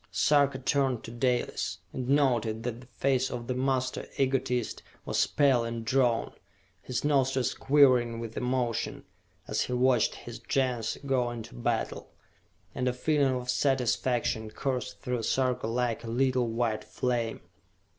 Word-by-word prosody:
Sarka 140 -2 +3
turned 130 -2 0
to 115 - -8
Dalis, 125 +1 -1 0.2
and 130 -1 -4
noted 120 -6 +2
that 120 0 -4
the 125 - -15
face 130 +1 0
of 120 - -5
the 125 - -2
master 130 0 -1
egotist 130 -3 0 0.2
was - - +1
pale 135 -5 +3
and 115 -1 -4
drawn, 120 -1 +1 0.5
his 125 +3 -3
nostrils 135 -3 +2
quivering 130 -5 +4
with 115 -1 -6
emotion, 125 -2 -1 0.4
as - - 0
he 125 - -2
watched 125 -2 +3
his - - -9
Gens 125 -4 -1
go 130 -3 +1
into 115 -2 -7
battle, - - -2 0.6
and 125 - -2
a 125 - +2
feeling 140 0 +1
of 125 0 -2
satisfaction 125 -4 0
coursed 125 +1 -3
through 125 -2 -2
Sarka 125 0 0
like 120 0 -1
a - - -7
little 125 +1 +1
white 115 -2 -1
flame. 120 -3 -2
125 Hz, 145 wpm, -29 LUFS, 115-130 Hz, 0.6 s, quivering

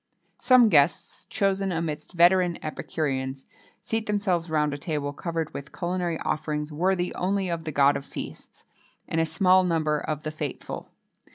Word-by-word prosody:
Some 250 -3 +6
guests, 150 -2 +2
chosen 195 -2 0
amidst 160 -1 -4
veteran 175 0 +4
epicureans, 135 -3 -3 0.4
seat 225 0 -2
themselves 190 -5 0
round 150 -2 +1
a - - -3
table 145 -2 -3
covered 165 0 -3
with 140 0 -7
culinary 175 -2 -2
offerings 150 -1 -2
worthy 180 +3 0
only 190 0 -1
of 165 -1 -3
the 155 - -3
God 140 0 +4
of - - -3
Feasts, - - -9 0.4
and 165 - 0
a 165 - +1
small 185 +4 +4
number 155 -4 +1
of 155 0 -4
the 155 - -3
faithful. 150 -3 -6
165 Hz, 155 wpm, -26 LUFS, 150-185 Hz, 0.4 s, Some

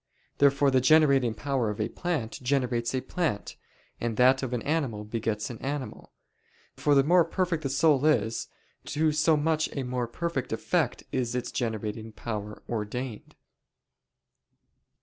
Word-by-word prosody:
Therefore 140 0 +4
the 130 -1 +3
generating 135 -5 +4
power 130 -1 -1
of 105 - -5
a 105 - 0
plant 150 -10 -3
generates 125 -2 0
a 130 - 0
plant, 155 - -2 0.4
and 115 -2 -2
that 130 +1 +5
of 130 -2 -3
an 125 -2 -2
animal 140 -9 -1
begets 110 +1 -3
an 115 - -9
animal. 140 -1 -5 0.6
For 145 -1 +2
the 135 - +6
more 175 +4 +5
perfect 170 -1 -1
the 140 - -2
soul 140 0 +3
is, 115 -7 +1 0.4
to 155 +1 +1
so 155 +1 +3
much 155 +1 +1
a 135 - -1
more 125 -1 -2
perfect 140 +1 -3
effect 135 +4 0
is 125 -2 -1
its 125 - -3
generating 110 -1 -3
power 105 -2 -6
ordained. 115 +1 -5
130 Hz, 150 wpm, -28 LUFS, 115-150 Hz, 0.6 s, the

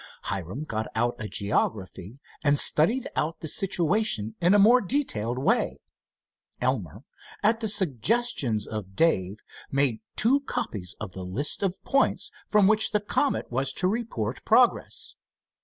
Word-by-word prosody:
Hiram 95 - -4
got 110 -7 -4
out 120 +2 +1
a 110 - -5
geography 100 +2 -2 0.2
and 145 -1 +3
studied 215 - +3
out 160 +2 -2
the 160 - -5
situation 180 - +1
in 175 +4 +4
a - - +6
more 235 +5 +6
detailed 125 - -1
way. 130 - 0 0.8
Elmer, 110 - -2 0.4
at 220 +2 +3
the 225 - -2
suggestions 185 - +1
of 100 -3 -7
Dave, 105 - +1 0.3
made 135 -5 +1 0.2
two 255 +6 +3
copies 215 - -5
of 105 -3 -6
the 95 - -8
list 95 +11 +1
of 195 -2 -1
points 275 - +1 0.2
from 210 -2 +4
which 215 +2 +3
the 210 - +3
Comet 210 - -1
was 135 +2 0
to 180 - +1
report 205 - -3
progress. - - +2
145 Hz, 140 wpm, -26 LUFS, -, 0.8 s, a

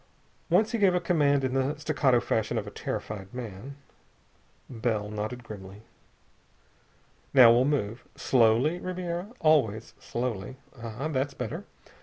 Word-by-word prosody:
Once 215 0 +3
he 230 - -1
gave 190 -3 +4
a - - +3
command 145 -5 +2
in 130 -1 -1
the 135 +3 0
staccato 145 -4 +2
fashion 110 -2 -1
of - - -2
a - - -8
terrified 100 -2 -5
man. 120 +2 -7 0.9
Bell 110 -4 -2
nodded 110 +4 -4
grimly. 100 -2 -10 1.5
"Now 125 -3 +9
we'll 120 +2 +4
move. 130 -6 -1
Slowly, 125 +7 +3
Ribiera! 180 +2 -4
Always 130 - +2
slowly.... 120 -1 -4 0.2
Ah! 115 +5 -4
That's 140 -2 -2
better! 125 -4 -5
125 Hz, 130 wpm, -28 LUFS, 110-150 Hz, 1.5 s, Now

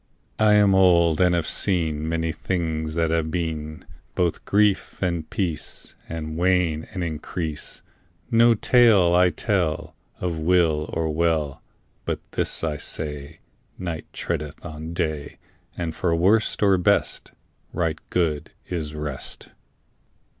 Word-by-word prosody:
I 110 -1 +5
am 100 -2 +5
old 85 -4 +4
and 90 -1 +4
have 85 -2 0
seen 80 -5 0
Many 80 0 0
things 80 -3 -2
that 85 -1 +1
have 80 -1 0
been; 80 -2 -4 0.3
Both 85 -2 0
grief 100 -1 +2
and 85 -4 -2
peace 85 -6 -2 0.2
And 80 -1 -5
wane 90 -3 +1
and 90 -2 -3
increase. 80 -1 -4 0.5
No 115 0 +6
tale 105 -7 +5
I 90 +1 +5
tell 90 -7 -1 0.2
Of 85 -3 -2
ill 80 -4 +3
or 80 -1 -1
well, 80 -3 0 0.4
But - - -2
this - - 0
I 75 -2 -1
say: 75 0 -5 0.4
Night 85 -4 -5
treadeth 75 -2 -4
on 80 0 -7
day, 80 -4 -3 0.4
And 85 -2 -3
for 85 -1 0
worst 100 +6 +2
or 95 -2 +4
best 90 - +1 0.4
Right 80 -2 -1
good 80 -3 -1
is 80 -4 -4
rest. 75 -3 -5
85 Hz, 130 wpm, -24 LUFS, 80-90 Hz, 0.5 s, No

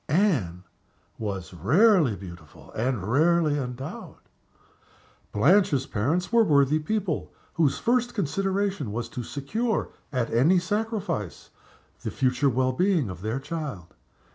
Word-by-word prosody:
Anne 140 - +1 0.6
was 95 -4 -4
rarely 150 - +4
beautiful 85 -4 -12
and 120 -3 -1
rarely 150 - +2
endowed. 125 0 -6 1.1
Blanche's 145 - +3
parents 165 - -1
were 230 -1 +6
worthy 145 -4 +3
people, 185 +1 -2 0.2
whose 155 -4 +2
first 245 0 0
consideration 195 - -1
was 115 +2 -3
to 120 - -6
secure, 200 - -2 0.2
at 125 -5 -1
any 145 +11 +4
sacrifice, 200 - -3 0.5
the - - -3
future 130 +1 +1
well 130 +1 +1
being 175 - +1
of 90 -1 -9
their 110 +6 -2
child. 135 - -6
140 Hz, 115 wpm, -26 LUFS, 115-185 Hz, 1.1 s, were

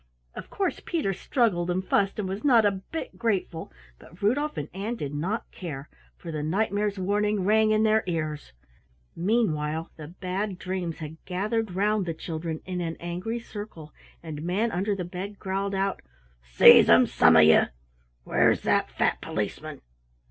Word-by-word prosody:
Of - - -9
course 390 - -2
Peter 310 - -1
struggled 190 -4 0
and 185 +1 -1
fussed 200 -1 +1
and 205 -3 -2
was 195 +3 -5
not 240 -6 +5
a 205 - +4
bit 195 +12 -7
grateful, 195 -7 -2 0.3
but 170 - -16
Rudolf 285 +9 0
and 145 - -3
Ann 205 +6 -3
did 145 -10 -5
not 180 +10 -3
care, 150 -6 -7 0.3
for 170 - -8
the 155 -1 -3
Knight 185 +9 0
mare's 205 0 -1
warning 205 +1 0
rang 215 +1 +4
in 215 0 +3
their 220 0 +3
ears. 155 - -3 0.6
Meanwhile 165 -6 0
the 155 -2 -8
Bad 185 +3 -4
Dreams 185 -3 -4
had 155 0 -9
gathered 205 +2 -2
round 205 0 +1
the 165 - -1
three 160 - -20
children 160 -1 -4
in 180 -1 -3
an 165 -1 -4
angry 180 +7 -4
circle, 205 -9 -9 0.3
and 155 -3 -6
Manunderthebed 190 0 -2
growled 195 +1 -2
out: 195 0 -1 0.4
"Seize - - +7
'em, - - +7
some 80 0 +4
of 80 - +8
you! 80 +1 +6 0.6
Where's - - +2
that - - +1
fat - - 0
Policeman?" - - -4
190 Hz, 160 wpm, -26 LUFS, 165-210 Hz, 0.6 s, of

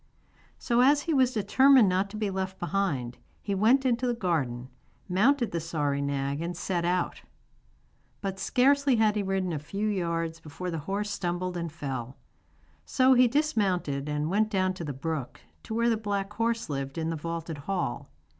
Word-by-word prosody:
So 240 0 +1
as 285 +3 +4
he 330 - -1
was 260 -3 +4
determined 255 +3 +5
not 190 +2 +1
to 215 - -7
be 210 -2 -1
left 190 0 -3
behind, 165 -10 -2 0.2
he 200 - -3
went 235 +8 +3
into 250 0 +1
the 240 - 0
garden, 140 - -1 0.4
mounted 235 +7 +2
the 170 - -1
sorry 150 -4 -1
nag, 140 +1 -2
and 170 0 -4
set 175 -2 -1
out. 180 0 -1 1.0
But 195 -1 -4
scarcely 275 +4 +3
had 215 -2 +3
he 210 - +1
ridden 190 -2 -1
a 150 - -2
few 200 +8 -3
yards 165 -4 -2
before 165 +3 -6
the 165 - -3
horse 205 +1 -1
stumbled 180 -1 -2
and 170 -2 -3
fell. 135 -4 -5 0.7
So 260 - +4
he 250 0 +6
dismounted 195 - 0
and 150 0 -1
went 215 +2 +2
down 185 -3 +1
to 185 - -7
the 150 - -3
brook, 140 -1 -4 0.2
to 220 - -6
where 235 +1 +2
the 225 - +1
black 205 -1 -3
horse 230 +1 -1
lived 135 -1 -4
in 165 0 -1
the - - -2
vaulted 165 0 -5
hall. 180 -7 -2
190 Hz, 180 wpm, -28 LUFS, 160-220 Hz, 1.0 s, he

